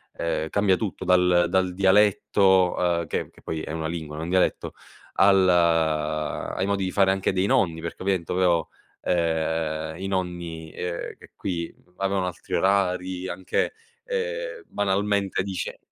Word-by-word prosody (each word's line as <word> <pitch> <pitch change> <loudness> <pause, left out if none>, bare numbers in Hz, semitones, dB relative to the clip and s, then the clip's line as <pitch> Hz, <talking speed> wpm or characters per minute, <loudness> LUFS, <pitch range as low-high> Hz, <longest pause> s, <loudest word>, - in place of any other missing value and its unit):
ehm, 80 -1 -2
cambia 100 0 +3
tutto 105 -1 -4
dal 90 -1 +4
dal 95 0 +1
dialetto, 95 -2 +3
ehm, 80 - -6
che - - -3
che - - -20
poi 80 -1 -4
è - - -6
una 80 0 -3
lingua, 80 -3 -5
non 80 - -4
un - - -5
dialetto, 95 0 +1 0.4
al 95 -1 +5
ai 80 0 +1
modi 100 -1 0
di 95 - -2
fare 95 -1 +3
anche 95 0 0
dei 95 +1 +1
nonni. 85 -5 +2
Perché, 85 +2 -6
ovviamente, 95 -4 -1 0.7
ehm, 80 -2 -1
i 95 - -4
nonni, 85 -4 -4
ehm, 90 -1 -5
che - - -16
qui 85 -3 -4 0.2
avevano 95 -1 0
altri 90 - -7
orari, 95 -1 +1
anche, 95 0 -1 0.3
ehm, - - -3
banalmente 100 0 0
dice 95 -1 -4
90 Hz, 145 wpm, -25 LUFS, 85-95 Hz, 0.7 s, al